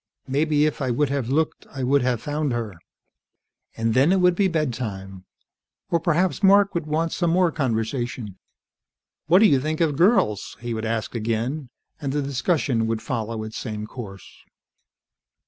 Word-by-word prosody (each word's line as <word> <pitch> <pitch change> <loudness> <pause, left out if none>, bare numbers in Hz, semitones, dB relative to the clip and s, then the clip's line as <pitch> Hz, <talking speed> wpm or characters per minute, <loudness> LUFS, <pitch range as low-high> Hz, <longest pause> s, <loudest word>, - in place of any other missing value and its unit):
"Maybe 150 +2 +2
if 155 - -2
I 130 - 0
would 135 +4 +1
have 135 -4 -2
looked, 155 +3 -1
I 135 -2 -5
would 140 +2 +3
have 125 -2 0
found 150 -2 -1
her." 115 -4 -3 1.0
And 115 0 0
then 135 +7 +4
it 190 - +3
would 180 0 +4
be 195 +2 +2
bedtime. 110 - -3 0.7
Or 170 - +3
perhaps 170 +4 +1
Mark 200 0 +5
would 170 -3 -3
want 160 +3 -1
more 175 0 +3
conversation. 120 - -2 0.9
"What 180 +6 +6
do - - +8
you 140 -9 +5
think 155 +2 -2
of 160 -4 +2
girls?" 170 - +2
he 120 0 -4
would 110 0 -3
ask 110 0 -2
again, 120 +5 -2 0.3
and 140 -2 -2
the 145 -1 0
discussion 135 -4 0
would 110 -1 -2
follow 115 -2 -3
its 110 0 -7
same 105 -2 -5
course. 105 -5 -9
135 Hz, 165 wpm, -23 LUFS, 115-160 Hz, 1.0 s, do